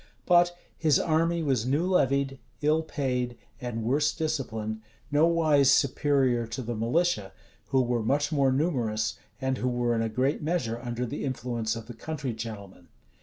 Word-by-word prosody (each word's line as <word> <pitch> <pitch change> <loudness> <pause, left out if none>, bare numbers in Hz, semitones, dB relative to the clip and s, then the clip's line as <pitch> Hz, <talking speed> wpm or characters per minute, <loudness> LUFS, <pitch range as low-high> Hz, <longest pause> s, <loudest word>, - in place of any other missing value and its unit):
But 175 0 +4 0.2
his 155 -4 +3
army 165 +1 +1
was 130 -5 +1
new 145 +6 +1
levied, 140 -6 +1 0.2
ill 155 +2 +3
paid, 125 -6 -2 0.2
and 120 -3 -4
worse 145 +6 +1
disciplined; 110 -9 -3 0.3
nowise 155 -3 +4
superior 135 -4 +2
to 115 +3 -5
the 120 +1 -3
militia, 115 - 0 0.3
who 130 -1 +3
were 120 -1 0
much 145 +7 +1
more 140 -3 +3
numerous, 120 -8 0 0.2
and 130 -1 -1
who 125 - 0
were 120 -1 0
in 115 - 0
a 115 - 0
great 130 +6 0
measure 150 -8 -1
under 120 0 -3
the 135 +5 -5
influence 120 -4 -2
of 115 -1 -7
the 120 - -9
country 135 +1 -4
gentlemen. 100 -5 -8
130 Hz, 160 wpm, -28 LUFS, 115-150 Hz, 0.3 s, But